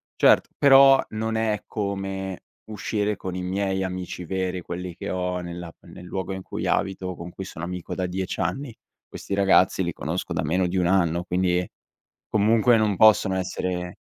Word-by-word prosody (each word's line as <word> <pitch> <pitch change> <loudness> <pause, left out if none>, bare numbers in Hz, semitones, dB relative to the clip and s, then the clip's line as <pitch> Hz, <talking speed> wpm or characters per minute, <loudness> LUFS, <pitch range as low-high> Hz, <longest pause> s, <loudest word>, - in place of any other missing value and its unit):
Certo, - - +4
però 135 -1 +7
non 110 +1 -3
è 110 -2 0
come 95 -2 -4 0.3
uscire 105 -1 -2
con 95 -1 -5
i 90 - -3
miei 95 +1 -1
amici 90 -1 -5
veri, 95 0 -2
quelli 90 0 -6
che - - -6
ho 90 0 -2
nella 85 0 -7
a 85 - -12
nel 90 - -11
luogo 95 +1 -4
in 95 0 -4
cui - - -5
abito, 95 -1 -1
con 85 +1 -8
cui 95 - -7
sono 85 -3 -7
amico 90 0 -5
da 95 - -2
10 95 +1 -4
anni. 135 -3 -2 0.3
Questi - - -7
ragazzi 95 -1 +4
li 85 - -1
conosco 85 +3 -4
da 85 - -1
meno 90 +4 +1
di 90 +1 -1
1 90 - +2
anno, 85 -2 +2
quindi 90 0 0 0.6
comunque 110 +3 +4
non 105 -3 +1
possono 100 -2 +5
essere 90 -1 -3
95 Hz, 180 wpm, -24 LUFS, 90-100 Hz, 0.6 s, però